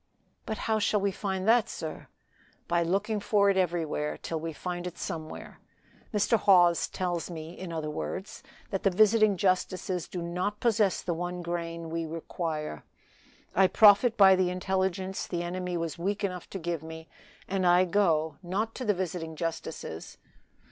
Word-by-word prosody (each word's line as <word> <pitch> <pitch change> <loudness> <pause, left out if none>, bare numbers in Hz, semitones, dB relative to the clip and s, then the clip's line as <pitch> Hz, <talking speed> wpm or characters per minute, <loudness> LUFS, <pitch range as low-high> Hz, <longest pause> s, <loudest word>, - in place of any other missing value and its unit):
"But 220 - -2
how 220 -1 +2
shall 210 0 +2
we 200 0 +1
find 190 0 -3
that, 230 -1 +4
sir?" 155 -1 -6 0.6
"By 170 0 +2
looking 200 +5 0
for 200 -1 +3
it - - -1
everywhere, 165 -4 -1
till 165 - -4
we 165 +1 -4
find 175 +2 -5
it 175 - -8
somewhere. 155 -1 -6 0.5
Mr. 215 +1 +2
Hawes 175 -4 +5
tells 175 -2 -3
me, 165 0 -7
in 185 -2 -7
other 155 -2 -3
words, 190 +5 -5 0.3
that 195 - -1
the 195 - +3
visiting 215 +1 +4
justices 185 -2 0
do 175 -2 -5
not 180 +5 -2
possess 215 -5 +2
the 175 - -1
one 175 +1 -4
grain 170 -1 -4
we 165 0 -2
require. 155 - -4 0.7
I 190 +1 +5
profit 210 +4 +6
by 190 -2 +8
the 185 -1 +2
intelligence 190 +1 -1
the 175 -1 -2
enemy 180 0 -3
was 165 -1 -4
weak 200 +4 -2
enough 180 -3 -3
to - - -5
give 170 -3 -3
me, 160 0 -9 0.4
and 190 -1 -1
I 175 +1 +5
go 165 -5 +1
not 200 +5 -2
to 255 - -4
the 210 -2 +2
visiting 170 -3 -4
justices. 160 - -5
180 Hz, 165 wpm, -29 LUFS, 165-195 Hz, 0.7 s, by